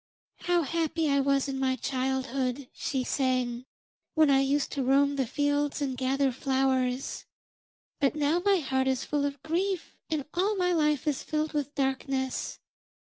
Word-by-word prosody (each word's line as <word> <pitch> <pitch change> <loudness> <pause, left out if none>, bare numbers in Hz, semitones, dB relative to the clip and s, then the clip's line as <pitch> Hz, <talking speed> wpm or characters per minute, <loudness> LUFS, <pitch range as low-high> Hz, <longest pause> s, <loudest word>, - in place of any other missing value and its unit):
'How 350 -1 +2
happy 325 +1 0
I 280 - +3
was 275 0 +2
in 270 -1 -3
my 260 -1 +1
childhood,' 260 0 -2
she 265 -2 -2
sang, 255 -2 0 0.5
'when 310 -3 +5
I 270 - +5
used 280 +1 +1
to 280 - -2
roam 280 +2 +3
the 265 -3 0
fields 290 +2 0
and 275 -3 -1
gather 265 +1 +1
flowers, 260 0 0 0.7
but 280 +1 +2
now 305 +3 +1
my 400 -1 +4
heart 265 -4 0
is 260 -1 0
full 290 -1 0
of 280 -1 -4
grief 365 +3 -1
and 305 -4 -1
all 390 +5 +1
my 360 -2 +1
life 300 -3 +1
is 290 -3 0
filled 310 0 -2
with 290 -1 -2
darkness. 265 -1 -1
275 Hz, 160 wpm, -28 LUFS, 265-300 Hz, 0.7 s, when